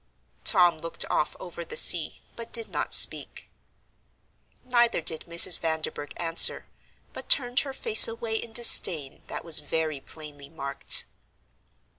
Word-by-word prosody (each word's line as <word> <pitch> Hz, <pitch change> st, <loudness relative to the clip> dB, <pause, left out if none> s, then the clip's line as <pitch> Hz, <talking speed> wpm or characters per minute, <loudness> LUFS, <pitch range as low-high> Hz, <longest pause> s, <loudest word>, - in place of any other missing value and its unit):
Tom 175 Hz, -5 st, 0 dB
looked 165 Hz, +1 st, -5 dB
off 150 Hz, -, -4 dB
over 170 Hz, -1 st, -11 dB
the 165 Hz, -, -10 dB
sea, 165 Hz, -4 st, +1 dB
but 230 Hz, -1 st, -13 dB
did 230 Hz, -2 st, -4 dB
not -, -, -6 dB
speak. -, -, +2 dB, 1.1 s
Neither 240 Hz, -4 st, -2 dB
did 160 Hz, -1 st, -4 dB
Mrs. 170 Hz, 0 st, +3 dB
Vanderburgh 160 Hz, -2 st, -7 dB
answer, 165 Hz, -1 st, +3 dB, 0.5 s
but -, -, -12 dB
turned 245 Hz, -3 st, +3 dB
her 275 Hz, -, -6 dB
face 440 Hz, -, +5 dB
away 225 Hz, 0 st, -8 dB
in 230 Hz, 0 st, -10 dB
disdain 170 Hz, -, +3 dB
that -, -, -10 dB
was 165 Hz, -3 st, 0 dB
very 155 Hz, 0 st, -6 dB
plainly 145 Hz, -1 st, -15 dB
marked. 140 Hz, -3 st, -4 dB
170 Hz, 135 wpm, -23 LUFS, 155-230 Hz, 1.1 s, face